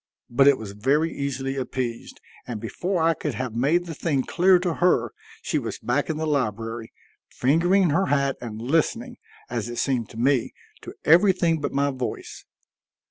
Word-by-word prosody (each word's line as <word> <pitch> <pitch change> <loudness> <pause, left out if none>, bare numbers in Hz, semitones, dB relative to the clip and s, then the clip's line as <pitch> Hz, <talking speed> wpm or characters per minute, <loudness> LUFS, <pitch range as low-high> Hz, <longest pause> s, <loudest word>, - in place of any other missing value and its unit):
But 135 +3 +4
it 140 -2 +6
was 105 -3 -7
very 140 +10 +1
easily 135 -1 -3
appeased, 125 -2 -4 0.3
and 120 -3 -4
before 175 - -2
I 165 0 +4
could 150 -4 -4
have 130 -3 -4
made 145 +9 +1
the 165 - -6
thing 145 -4 -1
clear 180 +5 +4
to 175 -1 -1
her 180 0 +2 0.3
she - - 0
was - - -5
back 140 +6 -1
in 155 - -1
the 160 - -2
library, 115 -5 -2 0.4
fingering 175 +6 +2
her 190 +5 +2
hat 140 -1 +1
and 110 -3 -6
listening, 165 - -1 0.3
as 120 -1 -3
it 120 - -5
seemed 125 -5 0
to - - -12
me, 130 0 +1 0.3
to - - -10
everything 170 -1 +4
but - - -2
my 140 +1 +1
voice. 130 -2 -6
140 Hz, 175 wpm, -24 LUFS, 120-165 Hz, 0.4 s, it